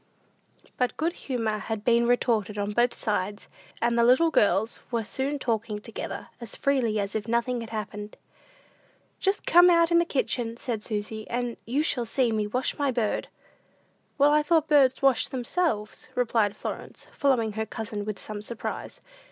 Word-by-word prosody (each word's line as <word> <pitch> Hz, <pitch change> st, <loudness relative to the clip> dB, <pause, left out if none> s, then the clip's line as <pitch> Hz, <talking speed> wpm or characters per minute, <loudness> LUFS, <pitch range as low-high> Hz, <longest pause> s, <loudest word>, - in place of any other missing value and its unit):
But 250 Hz, -1 st, 0 dB
good 330 Hz, +2 st, 0 dB
humor 225 Hz, -8 st, -2 dB
had 220 Hz, -1 st, -4 dB
been 235 Hz, 0 st, +4 dB
restored 225 Hz, -4 st, +1 dB
on 205 Hz, 0 st, -1 dB
both 240 Hz, +3 st, +3 dB
sides, 205 Hz, -2 st, -2 dB, 0.4 s
and 235 Hz, 0 st, +2 dB
the 235 Hz, -, +4 dB
little 260 Hz, +8 st, +5 dB
girls 210 Hz, -2 st, +2 dB
were 235 Hz, -2 st, -1 dB
soon 270 Hz, +6 st, -2 dB
talking 225 Hz, -4 st, -2 dB
together, 220 Hz, +1 st, -6 dB
as 235 Hz, -4 st, -5 dB
freely 245 Hz, -6 st, +1 dB
as 200 Hz, 0 st, -2 dB
if 220 Hz, 0 st, -3 dB
nothing 235 Hz, +1 st, 0 dB
had 230 Hz, -, -7 dB
happened. 210 Hz, -1 st, -6 dB, 1.0 s
"Just 390 Hz, +1 st, 0 dB
come 350 Hz, +1 st, +7 dB
out 335 Hz, -1 st, +4 dB
in 340 Hz, -, +6 dB
the 340 Hz, -, +2 dB
kitchen," 240 Hz, -6 st, -1 dB
said 235 Hz, -3 st, -3 dB
Susy, 215 Hz, 0 st, -4 dB
"and 245 Hz, 0 st, -2 dB
you 275 Hz, +6 st, +1 dB
shall 250 Hz, -6 st, 0 dB
see 240 Hz, +1 st, +1 dB
me 215 Hz, -1 st, 0 dB
wash 250 Hz, +4 st, -1 dB
my 285 Hz, -1 st, +2 dB
bird." 235 Hz, -4 st, -1 dB, 0.9 s
"Why, 295 Hz, +1 st, +5 dB
I -, -, +2 dB
thought 315 Hz, 0 st, +2 dB
birds 275 Hz, -3 st, +4 dB
washed 270 Hz, -3 st, +3 dB
themselves," 245 Hz, -4 st, -2 dB
replied 225 Hz, -4 st, +1 dB
Florence, -, -, -7 dB
following 250 Hz, -6 st, +2 dB
her 220 Hz, +1 st, -3 dB
cousin 215 Hz, -2 st, -5 dB
with 210 Hz, -1 st, -4 dB
some 210 Hz, +2 st, -6 dB
surprise. 225 Hz, +2 st, -6 dB
235 Hz, 170 wpm, -27 LUFS, 215-265 Hz, 1.0 s, come